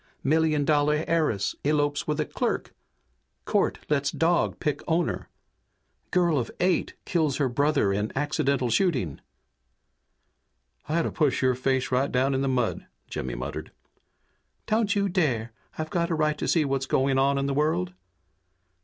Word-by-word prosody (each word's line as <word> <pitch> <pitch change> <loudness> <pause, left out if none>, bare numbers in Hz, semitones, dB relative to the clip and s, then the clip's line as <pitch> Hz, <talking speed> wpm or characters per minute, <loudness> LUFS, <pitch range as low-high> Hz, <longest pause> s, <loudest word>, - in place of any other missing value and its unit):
Million 155 0 +2
dollar 150 +1 +2
heiress 155 - +1
elopes 145 0 +1
with 150 0 -1
a 155 - +1
clerk! - - -2 0.7
Court - - +1
lets 140 -1 +1
dog 170 +3 +1
pick 150 -3 -1
owner! 170 0 0 0.8
Girl 175 -5 +2
of 120 - -3
eight 180 -1 +1
kills 155 -6 +1
her 140 - +2
brother 140 -5 +2
in 105 +2 -1
accidental 140 -3 0
shooting!" 125 - 0 1.7
"I 160 - +1
ought - - +3
to - - -2
push 150 -6 +1
your 130 0 +4
face 130 +1 0
right 130 +2 +1
down 130 +2 +2
in 135 - 0
the 135 - 0
mud," 125 -3 -1 0.2
Jimmy 65 -1 -4
muttered. - - -5 0.9
"Don't 215 -1 +1
you 200 0 +2
dare! 130 - 0 0.2
I've 155 +4 -4
a 170 -1 +1
right 155 -1 +1
to - - -2
see 160 -3 +3
what's 135 -1 -1
going 135 0 +2
on 140 +1 +3
in 140 - 0
the 140 - 0
world!" 135 - 0
145 Hz, 155 wpm, -26 LUFS, 130-160 Hz, 1.7 s, your